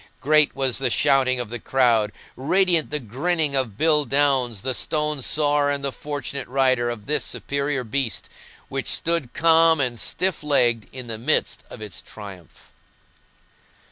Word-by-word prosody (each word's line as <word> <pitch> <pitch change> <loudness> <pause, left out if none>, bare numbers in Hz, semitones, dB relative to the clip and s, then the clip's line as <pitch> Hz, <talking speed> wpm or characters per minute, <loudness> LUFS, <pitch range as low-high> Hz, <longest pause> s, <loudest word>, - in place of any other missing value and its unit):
Great 150 +2 +3
was 135 -2 0
the 135 - 0
shouting 135 -3 +2
of 120 -3 -4
the 120 +1 -5
crowd, 115 -4 +2 0.2
radiant 175 +4 +2
the 150 - -2
grinning 150 +5 -1
of 125 -7 -1
Bill 155 0 +3
Downes 135 -7 +1
the 130 0 -1
stone 150 +2 -1
sawyer 145 +1 +1
and 140 -1 -1
the 140 - -1
fortunate 140 -2 -5
rider 130 -2 +1
of 110 -3 -6
this 150 +1 0
superior 140 -1 -2
beast, 120 -2 -2 0.4
which - - -4
stood 165 -7 -1
calm 165 0 +4
and 125 -4 -1
stiff 185 -3 -1
legged 120 -7 +1
in 130 -1 -7
the 115 -2 -5
midst 145 +7 0
of 110 - -9
its 105 -4 -8
triumph. 95 -5 -13
135 Hz, 155 wpm, -23 LUFS, 120-150 Hz, 0.4 s, calm